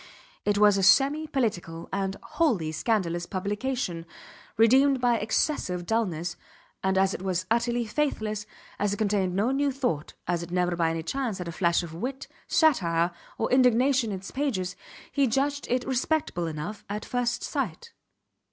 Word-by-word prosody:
It 205 Hz, 0 st, +2 dB
was 205 Hz, -1 st, +5 dB
a -, -, +1 dB
semi 280 Hz, +10 st, +4 dB
political, 185 Hz, -, -2 dB
and 195 Hz, 0 st, -1 dB
wholly 230 Hz, -, 0 dB
scandalous 175 Hz, -2 st, -1 dB
publication, 200 Hz, -2 st, -3 dB, 0.5 s
redeemed 260 Hz, +5 st, +5 dB
by 240 Hz, -2 st, +2 dB
excessive 210 Hz, -, 0 dB
dulness; 180 Hz, -6 st, -1 dB, 0.5 s
and 190 Hz, 0 st, +1 dB
as 190 Hz, 0 st, +3 dB
it -, -, -5 dB
was 185 Hz, -1 st, -1 dB
utterly 235 Hz, +1 st, +1 dB
faithless, 215 Hz, -5 st, -2 dB, 0.3 s
as 205 Hz, 0 st, +1 dB
it -, -, -3 dB
contained 200 Hz, -4 st, 0 dB
no 215 Hz, +6 st, +2 dB
new 280 Hz, +1 st, +1 dB
thought, 245 Hz, -, -2 dB
as 175 Hz, -1 st, 0 dB
it 170 Hz, -, -7 dB
never 180 Hz, 0 st, +1 dB
by 165 Hz, -1 st, +2 dB
any 165 Hz, 0 st, -2 dB
chance 245 Hz, +1 st, -2 dB
had 180 Hz, -, -5 dB
a -, -, -3 dB
flash 170 Hz, +1 st, +1 dB
of 165 Hz, -2 st, -8 dB
wit, 255 Hz, +10 st, -5 dB, 0.2 s
satire, 175 Hz, -, +3 dB, 0.3 s
or 225 Hz, -, -1 dB
indignation 255 Hz, 0 st, +4 dB
in 195 Hz, -, -2 dB
its 190 Hz, +1 st, -9 dB
pages, 200 Hz, -11 st, -1 dB, 0.4 s
he 280 Hz, -2 st, +2 dB
judged 280 Hz, +4 st, 0 dB
it 250 Hz, +1 st, 0 dB
respectable 260 Hz, -, 0 dB
enough, 160 Hz, +7 st, -5 dB
at 210 Hz, +1 st, -4 dB
first 245 Hz, -1 st, -1 dB
sight. 465 Hz, -1 st, -3 dB
210 Hz, 160 wpm, -27 LUFS, 180-255 Hz, 0.5 s, was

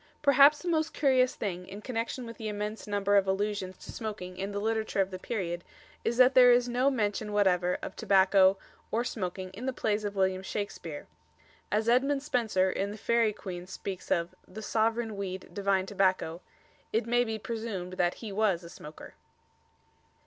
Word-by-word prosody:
Perhaps 285 Hz, +2 st, +6 dB
the -, -, -5 dB
most 320 Hz, -2 st, 0 dB
curious 260 Hz, -3 st, +3 dB
thing 180 Hz, -3 st, -4 dB
in 195 Hz, +2 st, -8 dB
connexion 235 Hz, +2 st, -3 dB
with 230 Hz, -1 st, -9 dB
the 220 Hz, -, -5 dB
immense 210 Hz, +1 st, -4 dB
number 205 Hz, 0 st, +2 dB
of 195 Hz, -1 st, +3 dB
allusions 195 Hz, -1 st, -1 dB
to -, -, -10 dB
smoking 205 Hz, -5 st, -6 dB
in 195 Hz, +2 st, -4 dB
the 200 Hz, -, -4 dB
literature 220 Hz, -1 st, -1 dB
of 195 Hz, 0 st, +2 dB
the 185 Hz, -, -6 dB
period 175 Hz, -5 st, -3 dB, 0.4 s
is 235 Hz, -, -1 dB
that 255 Hz, +1 st, +6 dB
there 250 Hz, -1 st, +8 dB
is 245 Hz, 0 st, +4 dB
no 250 Hz, +3 st, +2 dB
mention 210 Hz, -4 st, -1 dB
whatever 180 Hz, -3 st, +2 dB
of -, -, -6 dB
tobacco 195 Hz, 0 st, +4 dB, 0.3 s
or 230 Hz, +2 st, 0 dB
smoking 185 Hz, -5 st, -4 dB
in 230 Hz, +7 st, -7 dB
the -, -, +1 dB
plays 215 Hz, -3 st, -1 dB
of 205 Hz, -1 st, -3 dB
William 190 Hz, -1 st, +1 dB
Shakespeare. 190 Hz, -6 st, -5 dB, 0.7 s
As 215 Hz, +2 st, +1 dB
Edmund 275 Hz, +4 st, +3 dB
Spenser, 220 Hz, -9 st, +1 dB
in 195 Hz, +2 st, -2 dB
the 210 Hz, -, -7 dB
"Faerie 230 Hz, 0 st, +2 dB
Queene," 180 Hz, -3 st, -7 dB
speaks 190 Hz, 0 st, -6 dB
of 170 Hz, +1 st, 0 dB
The 215 Hz, +4 st, -9 dB
soveraine 225 Hz, 0 st, 0 dB
weede, 190 Hz, -2 st, -5 dB
divine 195 Hz, -1 st, +1 dB
tobacco, 185 Hz, -4 st, 0 dB, 0.5 s
it 225 Hz, +1 st, +1 dB
may 240 Hz, +1 st, +3 dB
be 220 Hz, -2 st, -3 dB
presumed 220 Hz, -5 st, -5 dB
that 175 Hz, -1 st, +1 dB
he 220 Hz, -3 st, -7 dB
was 195 Hz, -4 st, +1 dB
a 170 Hz, -, -10 dB
smoker. 150 Hz, +1 st, -11 dB
205 Hz, 180 wpm, -29 LUFS, 190-230 Hz, 0.7 s, there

